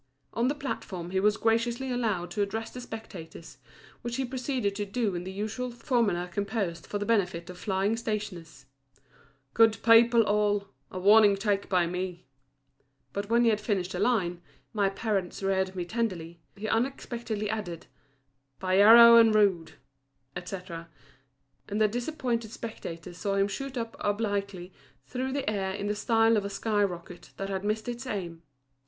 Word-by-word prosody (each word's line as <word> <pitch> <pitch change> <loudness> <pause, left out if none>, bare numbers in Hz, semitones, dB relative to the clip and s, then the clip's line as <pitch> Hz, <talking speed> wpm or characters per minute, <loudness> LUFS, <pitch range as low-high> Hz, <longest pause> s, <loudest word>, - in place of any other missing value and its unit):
On 235 +2 +1
the 285 - 0
platform 185 -11 -5
he 190 - +1
was 210 +2 +3
graciously 235 +3 0
allowed 215 -8 -1
to 210 - -2
address 220 +3 -2
the 250 - -8
spectators, 175 - -9 0.4
which 240 0 -4
he 270 - -1
proceeded 250 -4 -2
to 205 - -1
do 205 0 -1
in 175 0 -4
the 190 - -5
usual 215 +5 -3
formula 230 -7 0
composed 195 -2 -3
for 205 - -2
the 205 - -3
benefit 180 -6 0
of 180 - -12
flying 195 +3 0
stationers 185 -11 -5 0.9
"Good 225 -1 +5
people 230 0 +6
all, 205 -1 +1 0.2
a - - -7
warning 205 +1 +6
take 200 -1 -1
by 180 -2 +3
me;" 180 0 -4 0.9
but 200 +1 -4
when 235 +1 +4
he 230 - +5
had 210 -1 -1
finished 195 -4 -1
the 180 - -4
line, 190 -6 +1 0.3
"My 200 -3 +2
parents 195 -2 -2
reared 190 -1 0
me 180 -1 -3
tenderly," 175 -6 -3 0.2
he 215 +2 -4
unexpectedly 230 -3 -2
added 205 -6 -4 0.7
"By 185 0 +1
yarrow 235 +3 +10
and 225 -2 +6
rue," 190 -6 +3 0.7
etc., 180 -2 -7 0.8
and 205 +1 -2
the 215 - +5
disappointed 240 -1 -2
spectators 180 -6 -8
saw 200 -1 -1
him 195 0 +3
shoot 265 +6 -5
up 230 -1 -4
obliquely 200 -3 -2 0.3
through 260 +1 -3
the 280 -1 -2
air 195 -2 -1
in 205 0 -4
the 205 - 0
style 225 +1 +3
of 205 - 0
a 200 - -3
sky 205 +1 0
rocket 175 -2 -6
that 195 0 -4
had 190 0 -3
missed 215 +2 -1
its 240 +2 -5
aim. 175 -7 -4
205 Hz, 165 wpm, -28 LUFS, 185-230 Hz, 0.9 s, yarrow